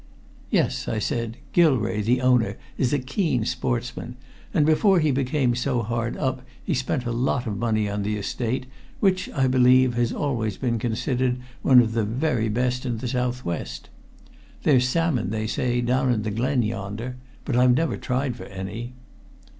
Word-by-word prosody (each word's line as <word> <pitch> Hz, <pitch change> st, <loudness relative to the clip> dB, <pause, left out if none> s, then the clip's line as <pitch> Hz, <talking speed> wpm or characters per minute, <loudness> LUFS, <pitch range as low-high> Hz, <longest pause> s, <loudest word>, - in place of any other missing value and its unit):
"Yes," -, -, 0 dB
I 110 Hz, -, -1 dB
said. 115 Hz, +2 st, -2 dB, 0.2 s
"Gilrae, 130 Hz, -11 st, +3 dB
the 120 Hz, +4 st, +1 dB
owner, 125 Hz, -2 st, +3 dB, 0.2 s
is 125 Hz, -, 0 dB
a 145 Hz, -, +3 dB
keen 130 Hz, -, -1 dB
sportsman, 120 Hz, 0 st, -3 dB, 0.4 s
and 150 Hz, -, +3 dB
before 180 Hz, +5 st, +4 dB
he 155 Hz, -2 st, +2 dB
became 130 Hz, -1 st, +1 dB
so 125 Hz, -1 st, 0 dB
hard 115 Hz, +1 st, -2 dB
up -, -, -1 dB, 0.2 s
he -, -, -1 dB
spent 120 Hz, -, -1 dB
a 120 Hz, -, -1 dB
lot 125 Hz, +2 st, 0 dB
of 110 Hz, -3 st, -2 dB
money 110 Hz, -2 st, +1 dB
on 100 Hz, 0 st, -2 dB
the 105 Hz, +1 st, -1 dB
estate, 120 Hz, +5 st, -2 dB, 0.3 s
which, 185 Hz, -2 st, +1 dB
I 135 Hz, -, +1 dB
believe, 130 Hz, 0 st, +5 dB
has 120 Hz, -1 st, +1 dB
always 115 Hz, -9 st, -2 dB
been 120 Hz, -3 st, -1 dB
considered 125 Hz, +2 st, 0 dB, 0.2 s
one 130 Hz, -2 st, +7 dB
of 115 Hz, -2 st, 0 dB
the 115 Hz, -1 st, 0 dB
very 115 Hz, +1 st, 0 dB
best 125 Hz, +3 st, 0 dB
in 120 Hz, -2 st, -2 dB
the 125 Hz, -, -4 dB
southwest. 120 Hz, -, -3 dB, 0.7 s
There's 125 Hz, -3 st, +4 dB
salmon, 145 Hz, -, +1 dB
they 110 Hz, +1 st, -2 dB
say, 120 Hz, +2 st, 0 dB
down 130 Hz, +1 st, +2 dB
in 110 Hz, -3 st, 0 dB
the 110 Hz, -, -2 dB
Glen 125 Hz, +4 st, +1 dB
yonder 110 Hz, +4 st, -4 dB, 0.3 s
but 135 Hz, -, -1 dB
I've 125 Hz, 0 st, +5 dB
never 165 Hz, +4 st, +1 dB
tried 130 Hz, -1 st, -2 dB
for -, -, -9 dB
any." 100 Hz, +6 st, -6 dB
125 Hz, 170 wpm, -24 LUFS, 115-130 Hz, 0.7 s, one